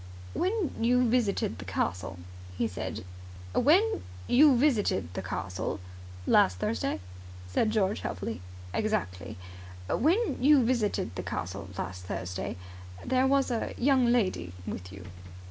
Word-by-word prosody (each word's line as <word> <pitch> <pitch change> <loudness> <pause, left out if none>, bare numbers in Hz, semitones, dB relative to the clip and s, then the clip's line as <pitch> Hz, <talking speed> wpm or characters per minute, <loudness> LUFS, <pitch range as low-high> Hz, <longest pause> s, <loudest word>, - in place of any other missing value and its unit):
"When 380 -2 0
you 250 +2 +3
visited 225 -4 +1
the - - -7
castle," 90 +1 -2 0.4
he 115 - +1
said, 95 -2 -5 0.5
"when 375 - +4 0.2
you 275 0 +6
visited 210 - +2
the - - -3
castle.. 95 +1 -3 0.2
." 90 0 -14
"Last 90 - +4
Thursday," 105 +1 -1 0.5
said 90 - +1
George 210 -2 +1
helpfully. 110 -4 -4 0.3
"Exactly. 210 - -2 0.5
When 350 - +2
you 280 -3 +6
visited 215 -6 0
the - - -4
castle 95 +1 -5
last 90 0 -5
Thursday, 90 +1 -4 0.5
there 260 +1 +3
was 275 -1 +3
a 230 - -2
young 260 -1 +4
lady 185 - +1
with 90 -1 -6
you." 95 -1 -10
210 Hz, 130 wpm, -29 LUFS, -, 0.5 s, you